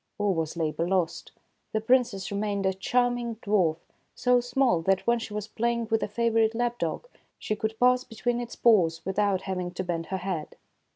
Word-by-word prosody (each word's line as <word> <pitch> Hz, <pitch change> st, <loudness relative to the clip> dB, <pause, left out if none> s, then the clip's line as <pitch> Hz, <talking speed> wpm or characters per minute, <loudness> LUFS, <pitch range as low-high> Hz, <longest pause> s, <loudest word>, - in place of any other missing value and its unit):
All 205 Hz, -2 st, +1 dB
was 160 Hz, -1 st, -3 dB
labor 165 Hz, +1 st, -1 dB
lost. 170 Hz, -3 st, -1 dB, 0.4 s
The 220 Hz, -, +2 dB
Princess 225 Hz, -5 st, +1 dB
re 200 Hz, -, -2 dB
mained 205 Hz, -2 st, -1 dB
a 190 Hz, -, +2 dB
charming 240 Hz, +4 st, 0 dB
dwarf, 200 Hz, -7 st, +1 dB, 0.4 s
so 250 Hz, -1 st, +3 dB
small 245 Hz, -7 st, +2 dB
that, 190 Hz, +3 st, +1 dB
when 235 Hz, 0 st, +3 dB
she 225 Hz, -, -7 dB
was 210 Hz, 0 st, -4 dB
play 235 Hz, +2 st, 0 dB
ing 235 Hz, -1 st, -3 dB
with 225 Hz, -, +2 dB
a -, -, -1 dB
favorite 225 Hz, +1 st, +1 dB
lap 240 Hz, 0 st, -1 dB
dog, -, -, -3 dB, 0.3 s
she 215 Hz, -, -2 dB
could 220 Hz, +1 st, -3 dB
pass 250 Hz, 0 st, +4 dB
between 240 Hz, +1 st, -2 dB
its 240 Hz, -1 st, -7 dB
paws 170 Hz, -8 st, +3 dB
without 195 Hz, 0 st, +1 dB
having 185 Hz, -2 st, -3 dB
to 185 Hz, -, -2 dB
bend 165 Hz, -2 st, -3 dB
her 190 Hz, -, -2 dB
head. 180 Hz, -4 st, -4 dB
210 Hz, 195 wpm, -27 LUFS, 185-235 Hz, 0.4 s, pass